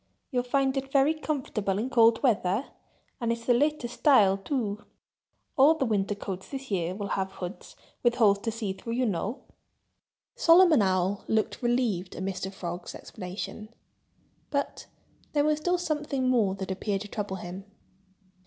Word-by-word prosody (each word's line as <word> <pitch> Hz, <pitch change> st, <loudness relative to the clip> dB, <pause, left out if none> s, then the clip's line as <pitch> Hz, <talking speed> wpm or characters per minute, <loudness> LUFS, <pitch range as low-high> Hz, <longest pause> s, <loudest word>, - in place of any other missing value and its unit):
You'll 250 Hz, -2 st, +1 dB
find 265 Hz, +2 st, +1 dB
it 270 Hz, 0 st, -3 dB
very 280 Hz, +2 st, +4 dB
comfortable 260 Hz, -11 st, -2 dB
in 240 Hz, +5 st, -2 dB
cold 230 Hz, +1 st, +5 dB
weather—and 230 Hz, +2 st, -2 dB
it's 230 Hz, 0 st, -4 dB
the 245 Hz, -, +4 dB
latest 270 Hz, -2 st, 0 dB
style, 210 Hz, -10 st, +5 dB
too. 210 Hz, -1 st, -3 dB, 0.7 s
All 290 Hz, +4 st, +6 dB
the 275 Hz, -, 0 dB
winter 205 Hz, -3 st, 0 dB
coats 190 Hz, -2 st, -6 dB
this 270 Hz, -3 st, -7 dB
year 180 Hz, -1 st, -1 dB
will 200 Hz, 0 st, -4 dB
have 190 Hz, 0 st, -2 dB
hoods, 195 Hz, -, -8 dB, 0.3 s
with 240 Hz, -1 st, +3 dB
holes 205 Hz, -5 st, +4 dB
to 225 Hz, +2 st, -2 dB
see 215 Hz, -4 st, -3 dB
through, 230 Hz, +4 st, -6 dB
you 250 Hz, +2 st, +1 dB
know." 210 Hz, -, -2 dB, 0.9 s
Solomon 335 Hz, -, +6 dB
Owl 190 Hz, 0 st, +1 dB
looked 220 Hz, +3 st, 0 dB
relieved 240 Hz, -7 st, 0 dB
at 185 Hz, -, -5 dB
Mr. 190 Hz, 0 st, -3 dB
Frog's 175 Hz, -2 st, -6 dB
explanation. 200 Hz, +3 st, -7 dB, 0.8 s
But 280 Hz, -1 st, -3 dB, 0.5 s
there 290 Hz, -1 st, +3 dB
was 305 Hz, 0 st, +2 dB
still 355 Hz, +3 st, +1 dB
something 295 Hz, -6 st, -1 dB
more 220 Hz, -7 st, +2 dB
that 190 Hz, -1 st, -5 dB
appeared 195 Hz, +1 st, -2 dB
to 210 Hz, -, -6 dB
trouble 205 Hz, -2 st, -4 dB
him. 185 Hz, +1 st, -7 dB
225 Hz, 155 wpm, -28 LUFS, 195-270 Hz, 0.9 s, All